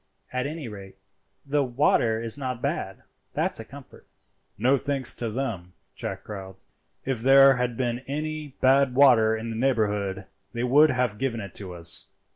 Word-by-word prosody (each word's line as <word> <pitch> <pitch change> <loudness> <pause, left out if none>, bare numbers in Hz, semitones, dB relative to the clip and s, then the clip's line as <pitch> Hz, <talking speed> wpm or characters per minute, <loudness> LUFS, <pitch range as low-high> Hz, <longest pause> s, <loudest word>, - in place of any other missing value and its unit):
At 125 +2 -1
any 155 -3 -6
rate, 100 -3 -10 0.5
the 145 +1 +1
water 120 -3 +2
is 115 -1 -1
not 130 -4 -4
bad, - - -3 0.3
that's - - 0
a - - -5
comfort." - - -14 0.5
"No 125 +7 +3
thanks 140 -1 0
to 115 - -3
them," 105 -7 -4 0.2
Jack - - -6
growled. 95 -2 -8 0.5
"If 130 -4 -2
there 135 +1 +7
had 125 -2 -2
been 120 -2 -1
any 150 0 -4
bad 135 0 +4
water 115 -5 +5
in 115 +1 -5
the 110 - -4
neighbourhood 105 -6 0 0.3
they 120 - -3
would 145 +5 +5
have 125 -5 -1
given 130 -3 -1
it 100 -4 -8
to 95 -3 -7
us." 85 0 0
125 Hz, 165 wpm, -25 LUFS, 110-135 Hz, 0.5 s, there